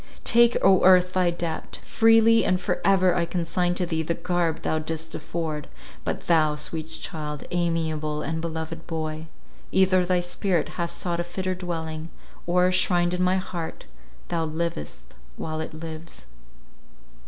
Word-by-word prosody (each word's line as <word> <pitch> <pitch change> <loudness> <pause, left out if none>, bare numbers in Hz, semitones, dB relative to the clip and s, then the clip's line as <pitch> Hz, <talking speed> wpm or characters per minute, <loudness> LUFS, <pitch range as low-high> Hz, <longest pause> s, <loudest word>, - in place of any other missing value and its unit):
Take, 235 0 +5
O 190 -1 +5
earth, 180 0 +6
thy 185 -2 +3
debt! 170 -2 -4
freely 225 0 +5
and 185 -1 +2
for 180 - -2
ever 185 -2 +4
I 170 -1 0
consign 175 +1 0
to 180 - 0
thee 160 -2 -1
the 165 +1 -1
garb 175 -3 -1
thou 155 - 0
didst 160 +1 -5
afford. 155 -2 -4 0.4
But - - -2
thou, 155 -3 +3
sweet 155 +1 -4
child, 150 -3 -5
amiable 160 -3 -1
and 160 0 -2
beloved 165 0 -5
boy, 155 -1 -4 0.4
either 185 -1 +4
thy 180 0 +2
spirit 175 0 -1
has 170 -1 -3
sought 170 0 -3
a - - 0
fitter 185 +2 -3
dwelling, 165 -3 -5 0.4
or, 180 +1 +3
shrined 175 -1 +2
in 180 - -1
my 185 +1 +3
heart, 175 -3 -5 0.4
thou 165 -1 0
livest 155 - -4 0.2
while 155 0 -3
it 160 - -6
lives. 160 +1 -9
170 Hz, 155 wpm, -25 LUFS, 160-180 Hz, 0.4 s, earth